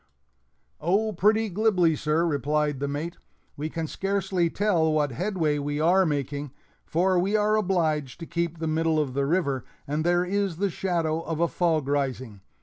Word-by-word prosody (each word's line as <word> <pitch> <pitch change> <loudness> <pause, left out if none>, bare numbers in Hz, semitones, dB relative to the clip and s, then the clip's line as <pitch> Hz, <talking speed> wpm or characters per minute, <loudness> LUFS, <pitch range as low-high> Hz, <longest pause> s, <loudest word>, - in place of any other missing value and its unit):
"Oh, 205 +7 +1
pretty 215 +5 +3
glibly, 185 -5 +2
sir," 155 +3 +1
replied 150 -1 0
the 140 - -1
mate; 155 +5 -4 0.4
"we 150 +2 -4
can 165 0 -3
scarcely 190 0 -1
tell 175 -5 +1
what 150 -2 +1
headway 165 - -1
we 145 +1 -2
are 180 +4 +4
making, 145 -1 -2 0.4
for 180 +2 +2
we 195 +4 +1
are 210 0 +3
obliged 160 -9 0
to - - -4
keep 170 0 -2
the 160 - -4
middle 160 0 +1
of 140 -4 -1
the 140 +1 0
river, 140 -6 0 0.2
and 150 +2 -1
there 175 +1 +2
is 195 -2 -1
the 200 +1 0
shadow 165 -3 -1
of 165 -1 -4
a 170 - +3
fog 160 -5 0
rising. 130 -7 -2
165 Hz, 170 wpm, -26 LUFS, 150-185 Hz, 0.4 s, are